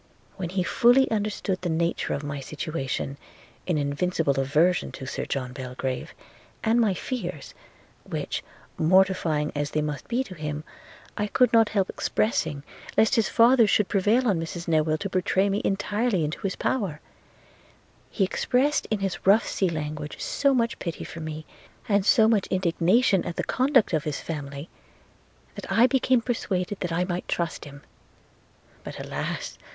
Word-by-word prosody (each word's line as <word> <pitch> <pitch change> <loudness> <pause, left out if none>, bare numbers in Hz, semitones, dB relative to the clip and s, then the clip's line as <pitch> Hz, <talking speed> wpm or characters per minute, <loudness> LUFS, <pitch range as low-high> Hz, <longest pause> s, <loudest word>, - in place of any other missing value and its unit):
When 180 -3 -4
he 185 0 0
fully 245 +7 +4
understood 205 -3 -1
the 180 - -2
nature 170 +1 0
of 145 - -5
my 145 -1 -4
situation, 140 -1 -4 0.5
in 175 -4 +1
invincible 145 0 0
aversion 155 +7 +2
to 130 - -7
Sir - - -4
John 130 -2 -3
Belgrave, 130 0 -5 0.5
and 230 +2 +3
my 205 -5 +2
fears, 180 - -5 0.5
which, - - -4 0.4
mortifying 170 -3 +3
as 145 0 -2
they 155 - -1
must 150 -1 -4
be 245 +2 0
to 195 - -10
him, 150 -2 -5 0.5
I 210 - 0
could 250 +4 +3
not 225 -2 +5
help 195 -3 +1
expressing, 160 - -1 0.3
lest 220 - +4
his 225 -4 +2
father 235 0 +5
should 205 -1 +2
prevail 215 +6 +2
on 195 -6 +2
Mrs 170 +1 -5
Newill 155 -1 +2
to 200 - -1
betray 190 +1 +1
me 200 +2 0
entirely 205 -2 0
into 150 - -4
his 195 -2 -2
power 195 - -1 0.6
– - - -30 0.3
he 200 - 0
expressed 265 +9 +1
in 215 -2 -1
his 195 -1 -3
rough 210 +3 +6
sea 190 - 0
language 150 -2 -5
so 280 -1 +1
much 235 -1 0
pity 170 -3 -4
for 170 - -8
me, 155 -1 -6 0.4
and 200 -1 +2
so 220 -5 +6
much 220 -4 +2
indignation 185 +4 +2
at 175 - -5
the - - -2
conduct 260 -6 +2
of 155 -2 0
his 150 -2 -2
family, 145 -1 -6 0.9
that - - -8
I 230 - +6
became 255 -1 +3
persuaded 190 -6 -2
I 170 +2 +1
might 180 -1 -3
trust 170 -2 -2
him. 140 0 -12 1.0
But, - - -8
alas! - - -4
185 Hz, 160 wpm, -26 LUFS, 155-215 Hz, 1.0 s, rough